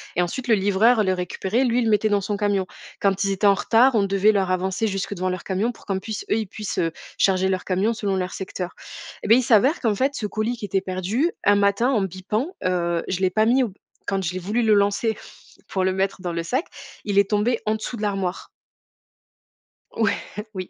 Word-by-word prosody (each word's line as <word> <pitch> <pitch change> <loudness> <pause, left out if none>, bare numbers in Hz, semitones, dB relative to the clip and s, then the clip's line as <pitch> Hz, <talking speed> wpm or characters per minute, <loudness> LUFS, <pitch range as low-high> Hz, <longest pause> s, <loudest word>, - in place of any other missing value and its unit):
et 175 - +2
ensuite, 245 +9 -4
le 225 - +5
livreur 210 +4 +3
le 185 -1 +1
récupérait, 190 +6 -1
lui, 245 0 +2
il - - +1
le 220 - +2
mettait 215 +1 +3
dans 205 -1 +2
son 205 +1 -2
camion. 200 -2 0 0.3
Quand 195 0 +1
ils 195 - +1
étaient 195 +2 -1
en 200 - +7
retard, 235 +6 +3
on 215 - +3
devait 195 +2 +3
leur 195 -3 0
avancer 190 +4 0
jusque 195 0 -3
devant 185 0 -2
leur 185 -1 -4
camion 200 +5 -1
pour - - -18
qu'en 190 -1 -1
puisse 215 +1 -6
eux, 215 - +3
ils 220 -3 -2
puissent, 210 +1 -5
heu, 165 -1 +1 0.3
charger 190 -1 +3
leur 185 -1 -2
camion 195 +5 +1
selon 200 -3 -2
leur 185 0 -2
secteur 185 -1 -5 0.5
et - - -3
beh, 225 - +7
il 255 - +2
s'avère 250 - +4
qu'en 225 -4 +1
fait, 270 +6 0
ce 210 - -3
colis 220 +3 -2
qui 210 - -5
était 195 -1 0
perdu 195 - -1
un 205 - +5
matin 200 +4 +2
en 230 -7 +2
bippant, 210 - -3
heu, 175 -2 0
je 185 0 -2
l'ai 185 -1 +2
pas 215 +4 +2
mis 250 +3 +4
au - - 0
b - - -16 0.3
quand 195 -1 -1
je 175 - -2
l'ai 185 - -3
voulu 210 +6 -1
le 220 -1 +4
lancer 205 +2 +2 0.5
pour 195 -4 -1
le 185 0 +1
mettre 190 0 -1
dans 175 - -3
le 170 - -2
sac, 255 - -1 0.4
il 200 -1 +2
est 200 - +2
tombé 220 +3 +1
en 215 - +2
dessous 220 +3 -5
de 215 - -8
l'armoire. 195 -3 -2 1.5
Ouais, 220 -3 +2 0.4
oui. 185 -1 -6
200 Hz, 240 wpm, -23 LUFS, 185-220 Hz, 1.5 s, en